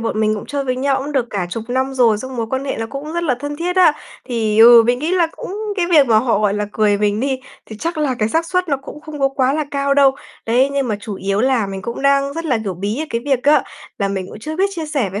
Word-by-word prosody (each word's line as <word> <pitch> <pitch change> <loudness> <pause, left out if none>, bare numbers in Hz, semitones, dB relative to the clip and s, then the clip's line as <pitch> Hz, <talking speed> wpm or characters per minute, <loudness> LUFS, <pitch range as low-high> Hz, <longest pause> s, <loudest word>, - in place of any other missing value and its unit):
bọn 225 -1 -2
mình 215 0 +2
cũng 210 - -7
chơi 285 -1 -3
với 255 -1 -1
nhau 270 0 +1
cũng 285 +2 -5
được 255 -4 +1
cả 195 -4 -2
chục 220 +4 -4
năm 260 +2 -1
rồi, 230 -5 +3
xong 260 +3 -7
mối 230 -1 -2
quan 265 +1 -2
hệ 275 - -3
nó 225 - -3
cũng 285 +5 -7
rất 340 0 -2
là 290 -7 +1
thân 290 0 -4
thiết 355 +3 -2
á. 355 -4 +6 0.4
Thì, 220 -3 0
ừ, 235 0 +9
mình 245 0 +2
nghĩ 310 +5 -2
là 350 -3 +3
cũng 400 +3 -6 0.2
cái 350 -2 +1
việc 295 -5 +6
mà 220 -3 +4
họ, 230 -3 +1
gọi 210 -1 +1
là, 210 0 -2
cười 210 -2 +2
mình 210 0 0
đi, 265 0 -1 0.3
thì 220 - -9
chắc 330 +8 -3
là 290 -4 0
cái 215 - +1
xác 325 +7 0
suất 365 0 -1
nó 280 - +1
cũng 275 +2 -11
không 305 -1 -9
có 275 - +3
quá 270 -1 +1
là 305 +1 -1
cao 280 0 0
đâu, 275 -1 +4 0.3
đấy, 250 +4 +3
nhưng 275 -2 -1
mà 215 - -1
chủ 210 -1 -6
yếu 195 +2 -1
là 255 -4 +2
mình 195 -1 -6
cũng 235 +2 -5
đang 275 0 +2
rất 330 +1 -4
là, 255 -7 +1
kiểu, 195 -3 -3
bí 200 +7 -3
ở - - -3
cái 230 - -1
việc 270 -3 0
á, 295 +2 +4 0.4
là 200 -1 0
mình 190 -2 -3
cũng - - -10
chưa 310 +6 -5
biết 385 +3 +3
chia 325 -3 -4
sẻ 275 -10 -1
với 200 +2 -4
260 Hz, 305 wpm, -18 LUFS, 220-290 Hz, 0.4 s, ừ